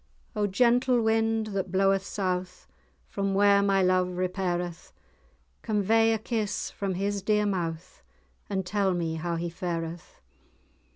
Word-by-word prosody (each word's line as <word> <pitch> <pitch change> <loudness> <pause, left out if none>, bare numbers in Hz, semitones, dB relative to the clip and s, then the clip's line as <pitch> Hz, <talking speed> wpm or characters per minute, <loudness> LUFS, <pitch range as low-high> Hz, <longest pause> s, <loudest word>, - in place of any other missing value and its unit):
"O 210 -1 +1
gentle 245 +4 +3
wind, 225 0 +1
that 190 -2 -2
bloweth 195 0 +2
south, 185 -2 -3 0.4
From 195 -1 -2
where 200 0 +5
my 195 -1 +2
love 185 0 +3
repaireth, 180 -2 -2 0.7
Convey 225 +1 +2
a 225 - +2
kiss 215 -2 -3
from 195 -2 -3
his 200 +2 -1
dear 210 +1 +2
mouth, 175 -3 -3 0.5
And 190 -2 -2
tell 195 -1 +1
me 165 -2 -2
how 170 +1 -2
he 170 +1 -2
fareth! 170 -1 -5
195 Hz, 130 wpm, -27 LUFS, 180-210 Hz, 0.7 s, where